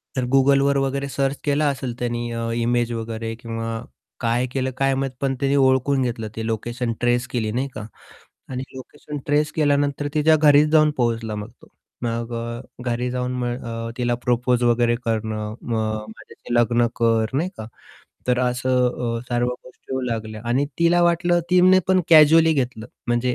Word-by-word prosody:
तर 130 -1 0
Googleवर 140 +1 +4
वगैरे 140 +1 -2
सर्च 135 0 -1
केला 145 +1 +1
असेल 130 -3 -3
त्यानी 120 -1 -2
अ, 115 0 -3
इमेज 120 0 0
वगैरे 115 0 -4
किंवा 115 -1 -5 0.5
काय 120 +1 +1
केलं 130 0 -1
काय 135 0 +2
माहीत, 135 0 -2
पण 135 -1 0
त्यानी 140 0 +1
ओळखून 135 0 +3
घेतलं 120 -3 -2
ते 110 - -4
लोकेशन 115 +2 -2
ट्रेस 120 +1 +1
केली 110 -3 -1
नाही 130 +5 -1
का. 105 - -6 0.6
आणि 130 -1 -4
लोकेशन 145 +3 -9
ट्रेस 150 +1 +2
केल्यानंतर 145 -1 +1
तिच्या 155 +1 +4
घरीच 150 0 +5
जाऊन 155 -1 +5
पोहोचला 115 -3 -1
मग 105 0 -6
तो. - - -16 0.4
मग 115 0 -3
अ, 115 0 -4 0.3
घरी 120 +1 -1
जाऊन 125 0 -2
मग 120 +1 -3
अ, 115 0 -5
तिला 120 -1 +1
प्रपोज 125 0 +1
वगैरे 120 0 +3
करणं. 110 -1 -2
मग 110 -2 -1
माझ्याशी 110 +2 -9
लग्न 120 0 +3
कर 115 0 +1
नाही 165 +6 0
का, 110 - -7 0.6
तर 125 -1 +2
असं 125 -1 0
अ, - - -6
सर्व 120 0 0 0.2
गोष्टी 130 - -12
होऊ 130 - -1
लागल्या. 110 -3 -4
आणि 130 +4 +2
तिला 170 +1 +4
वाटलं, 175 0 +2
तिने 180 +1 +6
पण 185 0 +4
कॅज्युअली 160 +1 +7
घेतलं. 125 -6 -2 0.2
म्हणजे, 120 +1 +1
125 Hz, 170 wpm, -22 LUFS, 115-140 Hz, 0.6 s, कॅज्युअली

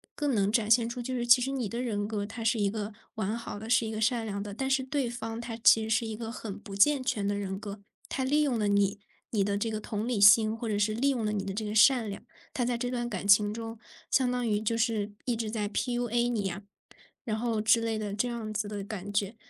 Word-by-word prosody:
更 290 -2 0
能 200 -2 +2
展 220 -2 +1
现 230 0 +4
出 245 +1 -6
就 245 +2 -4
是 240 -1 -2
其 240 +1 +7
实 270 - -2
你 255 -6 -2
的 235 - -4
人 210 -5 -2
格， 210 -2 -3
它 225 +2 -7
是 225 0 +2
一 200 -1 +1
个 215 0 -4 0.2
完 215 0 -2
好 230 -3 -7
的， 220 +2 -8
是 230 -1 +3
一 220 - -4
个 220 0 -4
善 230 0 +1
良 200 -2 -4
的， 205 0 -6
但 265 +6 -3
是 270 0 +2
对 270 -1 -1
方 225 -1 -5
他 235 -1 -5
其 225 -1 +5
实 220 - -5
是 225 +1 +1
一 220 -1 -5
个 225 0 -5
很 215 -3 -6
不 200 -1 -9
健 270 +7 +4
全 220 -6 -1
的 205 - 0
人 195 -1 -4
格。 200 -1 -7 0.3
他 265 - -2
利 290 +3 +2
用 275 -5 +1
了 210 -2 +1
你， 200 0 +2 0.3
你 210 -3 +2
的 200 0 0
这 225 +3 -1
个 215 -1 -3
同 210 +1 -3
理 245 -4 0
心， 215 +2 +7
或 230 0 -4
者 205 -1 0
是 210 +1 +1
利 255 +6 +1
用 245 -5 -1
了 210 - 0
你 200 -2 -2
的 195 0 -4
这 215 +2 -3
个 210 0 -4
善 230 0 +5
良， 200 - -7 0.3
他 250 - -1
在 240 0 0
这 245 +1 -2
段 240 -1 -2
感 200 -2 -4
情 205 +1 +5
中 225 0 -6 0.3
相 255 -2 +2
当 250 -1 -1
于 210 -1 +1
就 230 +1 0
是 220 -3 0
一 245 - 0
直 225 -1 -3
在 215 -2 -2
PUA 240 +2 0
你 220 -4 -1
呀， 195 +1 -4 0.6
然 215 -2 -1
后 225 -1 -1
之 220 +2 +4
类 225 -1 -1
的 205 -2 -4
这 230 +4 0
样 225 -3 -5
子 210 0 -2
的 205 -1 -4
感 205 -1 -6
觉。 205 +1 -1
220 Hz, 300 characters per minute, -29 LUFS, 205-240 Hz, 0.6 s, 其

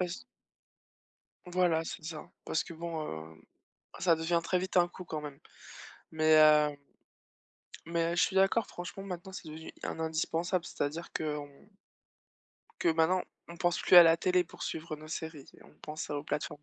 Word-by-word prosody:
Bah 180 - 0
z 125 -8 -7 1.2
Voilà, 175 -2 +2
c'est 155 - -7
ça, 155 -2 -7
parce 160 - 0
que - - -10
bon, 155 - -5
heu, 80 - -21 0.6
ça 170 -3 +4
devient 165 +2 +1
très 180 - +1
vite 185 0 -4
un 175 - +6
coup, 180 +1 -10
quand 155 -2 -4
même, 145 -2 -8 0.7
mais, 155 0 +2
hem 150 -1 +6 1.1
mais 170 0 0
heu, - - -3
je - - +4
suis 190 - +1
d'accord, 195 +4 +3
franchement, 180 +2 -7
maintenant, 190 -1 -7
c'est 165 - -8
devenu 160 +1 -9
un - - -4
indispensable. 165 +2 -1
C'est-à-dire 155 +1 -4
qu'on 150 -2 -3 1.3
que - - +2
maintenant, 165 +3 +2 0.3
on 170 - -9
pense 175 0 +1
plus 180 - +5
à 175 - +13
la 165 -1 +6
télé 180 +1 +2
pour 165 - -12
suivre 155 -1 -4
nos 155 +1 -12
séries, 160 -3 -6 0.2
on - - -18
pense 155 0 -6
aux 145 0 -3
plateformes 150 0 -4
160 Hz, 175 wpm, -31 LUFS, 155-175 Hz, 1.3 s, à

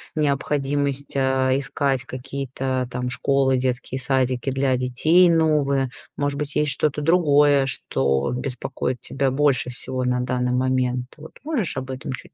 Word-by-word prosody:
необходимость, 140 -1 -1
э, 130 0 +2
искать 135 -1 -1
какие-то 130 -1 -4
там 125 0 -3
школы, 135 0 +1
детские 130 +1 -2
садики 130 -1 0
для 135 -1 +1
детей 155 +8 +3
новые, 145 -5 +2 0.3
может 145 0 -1
быть, 145 -1 -4
есть 150 -2 +2
что-то 150 +3 0
другое, 145 -4 +4
что 70 - 0
беспокоит 125 -1 -3
тебя 135 -1 -1
больше 135 -3 +2
всего 130 +1 -4
на 125 0 +1
данный 125 0 -1
момент. 125 -1 0
Вот 155 +1 -12
можешь 255 - -2
об 130 0 -4
этом 130 0 -5
чуть 125 - -8
135 Hz, 140 wpm, -23 LUFS, 125-145 Hz, 0.3 s, другое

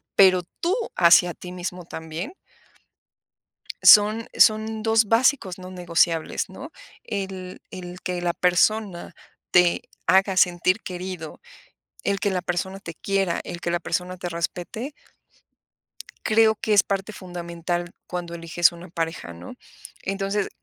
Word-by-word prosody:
Pero, 185 -2 +6 0.2
tú, 350 +4 +1 0.2
hacia 175 0 +6
ti 180 - -10
mismo 180 0 -6
también. 160 - -6 1.5
Son 215 +2 +7
son 220 0 +4
dos 225 -1 +4
básicos 225 -5 +2
no 185 0 -9
negociables, 170 -2 0
¿no? - - -10 0.3
El 190 -3 -5
el 180 0 -8
que 180 -1 -3
la 175 -1 +1
persona, 180 +1 +1 0.4
te 180 -1 +4 0.2
haga 190 0 +4
sentir 185 +3 +3
querido, 180 -3 -7 0.6
el 200 -1 0
que 205 - +1
la 185 -1 -1
persona 190 +2 -3
te 165 -3 -8
quiera, 195 -1 -1
el 175 - -7
que 170 - -2
la 175 - 0
persona 180 0 -3
te 175 0 -5
respete 180 - -4 1.3
creo 220 0 +4
que 215 - -2
es 205 -2 +6
parte 200 +2 -3
fundamental, 175 -1 -4 0.2
cuando 175 -1 -5
eliges 170 +1 +2
una 170 +2 -11
pareja, 165 - -4
¿no? 85 +1 -10 0.5
Entonces, 195 +1 -1
180 Hz, 130 wpm, -24 LUFS, 175-200 Hz, 1.5 s, Son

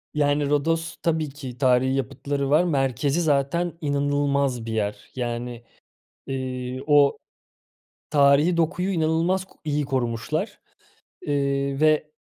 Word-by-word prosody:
Yani, 145 -1 +1
Rodos 165 +3 0
tabii 160 -2 0
ki 135 -4 -9
tarihî 130 0 +3
yapıtları 140 +1 -2
var, 155 +4 +5
merkezi 140 -1 0
zaten 160 +3 +1
inanılmaz 140 -4 0
bir 115 - -4
yer. 105 -1 -1 0.2
Yani, 120 -1 -4 0.6
eee, 130 -1 -4
o 145 -1 +5 0.9
tarihî 145 +4 +4
dokuyu 175 +3 0
inanılmaz 170 +3 +1
ko - - -24
iyi 150 -1 0
korumuşlar, 120 -4 -2 0.6
eee, 140 -1 -1
ve 155 0 +3
140 Hz, 115 wpm, -24 LUFS, 130-155 Hz, 0.9 s, var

